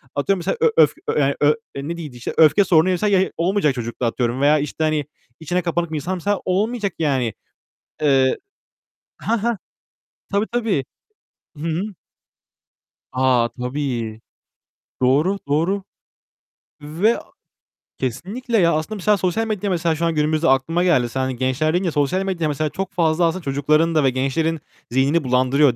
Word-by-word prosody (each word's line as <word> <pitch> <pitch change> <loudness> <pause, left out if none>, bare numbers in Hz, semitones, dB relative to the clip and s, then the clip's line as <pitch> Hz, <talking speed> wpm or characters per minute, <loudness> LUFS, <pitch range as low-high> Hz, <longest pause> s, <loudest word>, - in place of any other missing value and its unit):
atıyorum 180 +7 +1
mesela 175 - -2
ö 470 - +4 0.2
öf, - - +1 0.3
yani 140 -1 +2
ö 150 +1 +5 0.2
ne 145 +5 -4
deniyordu 150 -7 -8
işte, 120 - -5
öfke 155 +4 +6
sorunuysa 180 +2 +3
ya 190 -2 +2
olmayacak 170 -5 +1
çocukta 120 0 -4
atıyorum 120 +2 -1
veya 150 +2 +4
işte, 150 +2 -3
hani, 155 -2 +1 0.3
içine 175 +3 -1
kapanık 170 -1 -2
bir - - -3
insansa 185 +6 -1
olmayacak 205 +1 0
yani. 130 -8 0 0.7
Eee 135 -3 +3 0.8
Hah, 225 -2 -1
hah. 235 -1 +1 0.8
Tabii 205 +2 +1
tabii. 220 - 0 0.7
Hı - - -9
hı. 165 +2 -1 1.3
A, 130 -2 +2
tabii. 125 -4 -3 0.8
Doğru. 145 +10 +3
Doğru. 170 +7 0 1.0
Ve 170 +10 +1 0.8
Kesinlikle 200 - -2
ya 170 -4 +4
aslında 155 +8 -2
mesela 210 +1 +2
sosyal 190 +5 0
medyada 210 -2 -2
mesela 170 -2 +1
şu 170 +2 -1
an 165 - 0
günümüzde 155 +2 +1
aklıma 145 +7 +2
geldi. 130 -10 +3
Sen 130 - -4
hani 130 -1 -1
gençler 130 +5 0
deyince 175 -1 0
sosyal 150 +7 0
medyada 180 -5 -1
mesela 150 +1 -1
çok 190 +6 -4
fazla 170 -1 +2
aslında 170 +2 -1
çocukların 155 +4 +1
da 155 - +4
ve 135 - +4
gençlerin 135 +5 -1 0.3
zihnini 140 +6 +2
bulandırıyor 130 +2 +3
155 Hz, 150 wpm, -21 LUFS, 135-185 Hz, 1.3 s, öfke